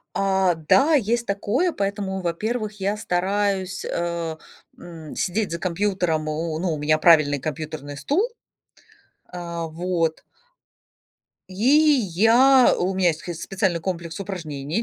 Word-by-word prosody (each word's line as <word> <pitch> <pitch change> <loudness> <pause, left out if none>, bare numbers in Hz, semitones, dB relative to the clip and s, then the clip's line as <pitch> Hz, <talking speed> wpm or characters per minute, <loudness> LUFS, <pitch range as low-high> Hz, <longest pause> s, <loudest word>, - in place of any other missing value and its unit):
А, 190 -2 +2
да, 270 - +3
есть 235 -2 +1
такое, 215 - 0
поэтому, 195 -1 -3
во-первых, 210 +4 -3
я 200 +2 0
стараюсь, 190 0 -1
э, 170 -2 -3 0.4
м, 165 -3 -10
сидеть 205 +3 -1
за 170 - -2
компьютером, 180 -3 -1
о 155 +1 -3
ну, 175 0 -1
у 155 - -3
меня 155 +1 +2
правильный 155 -3 +5
компьютерный 150 -1 -6
стул. 295 - 0 1.0
А, 170 -2 -5
вот. 165 0 -2 1.3
И, - - -10 0.6
я 245 +7 +5
у 185 +2 0
меня 185 -1 +3
есть 160 -1 -1
схыз 170 -2 -7
специальный 190 -3 -1
комплекс 170 0 -5
упражнений 165 -2 -4
180 Hz, 125 wpm, -23 LUFS, 165-200 Hz, 1.3 s, правильный